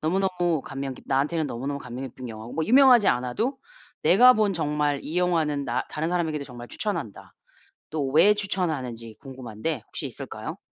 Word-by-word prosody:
너무너무 175 -2 0
감명 135 -1 -5
깊 - - -15
나한테는 150 +4 +1
너무너무 140 +4 -4
감명 125 0 -7
깊은 130 +1 -10
영화고 110 +2 -9
뭐 160 - 0
유명하지 250 -3 +6
않아도 125 - 0 0.4
내가 245 +7 +7
본 215 -4 +1
정말 150 -3 0
이 165 +4 -2
영화는 160 -5 +1
나 - - -1
다른 155 +1 -2
사람에게도 160 -4 -1
정말 120 -3 -10
추천한다.' 170 - -4 0.6
또 150 -3 -2
왜 175 +7 +6
추천하는지 140 - -3
궁금한데 130 +1 -5
혹시 - - -5
있을까요? - - -7
150 Hz, 390 characters per minute, -25 LUFS, 130-180 Hz, 0.6 s, 내가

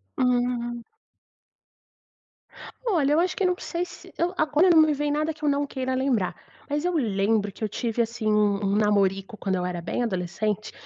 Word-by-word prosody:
Hum. 245 -1 0 2.0
Olha, 305 -10 +2
eu 320 - +4
acho 360 +1 +1
que 390 - 0
não 360 0 +2
sei 350 0 -3
se - - -13
eu 350 +2 0
agora 310 +4 +3
não 325 -2 +7
me 310 -1 +4
vem 295 +1 -1
nada 305 +2 0
que 305 0 -17
eu 295 - +3
não 285 0 +1
queira 260 -1 -3
lembrar, 255 -7 0 0.3
mas 295 +3 -1
eu 360 - +1
lembro 210 -5 +1
que 220 - -9
eu 215 - 0
tive, 235 +2 -1
assim 230 -1 -2
um 210 -1 +2
um 195 +1 +1
namorico 200 -1 +1
quando 190 -2 -1
eu 180 - -1
era 180 -1 -3
bem 175 +8 -2
adolescente, 210 +1 -2
240 Hz, 190 wpm, -25 LUFS, 205-295 Hz, 2.0 s, não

